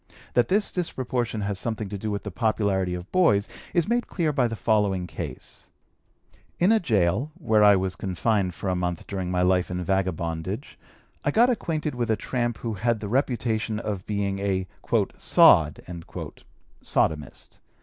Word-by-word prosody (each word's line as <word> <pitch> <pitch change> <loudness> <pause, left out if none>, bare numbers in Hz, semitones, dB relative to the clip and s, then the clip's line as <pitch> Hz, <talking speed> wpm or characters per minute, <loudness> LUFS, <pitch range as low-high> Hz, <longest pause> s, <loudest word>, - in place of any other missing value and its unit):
That 120 -1 +3
this 205 +2 +1
disproportion 125 - -2
has 100 -1 -2
something 110 -1 -2
to 100 - -5
do 110 - -3
with 100 -1 -3
the 105 - -5
popularity 100 -4 0
of 90 +2 -8
boys 135 - +3 0.2
is 170 -2 +1
made 240 +2 0
clear 160 -5 -1
by 130 -4 +2
the 115 - -4
following 100 -3 +1
case: 80 -4 -7 0.9
In 180 +5 +4
a 225 - +5
gaol, 110 - +1
where 110 -11 +3
I 105 -1 +7
was 95 -1 -1
confined 95 -1 0
for - - -5
a 90 - +1
month 90 -2 -2
during 95 -3 -4
my 90 0 +1
life 90 0 +2
in 90 0 -3
vagabondage, 95 - -2 0.4
I - - +1
got 240 +3 +4
acquainted 160 -9 -2
with 120 -2 -2
a 110 - +3
tramp 120 +2 -2
who 115 - -1
had 115 +2 0
the 105 - -5
reputation 115 -4 0
of 105 -5 -4
being 100 -2 -1
a 95 -2 0 0.5
"sod" 75 -2 +5 1.0
(sodomist). 75 -4 -1
105 Hz, 165 wpm, -25 LUFS, 95-120 Hz, 1.0 s, I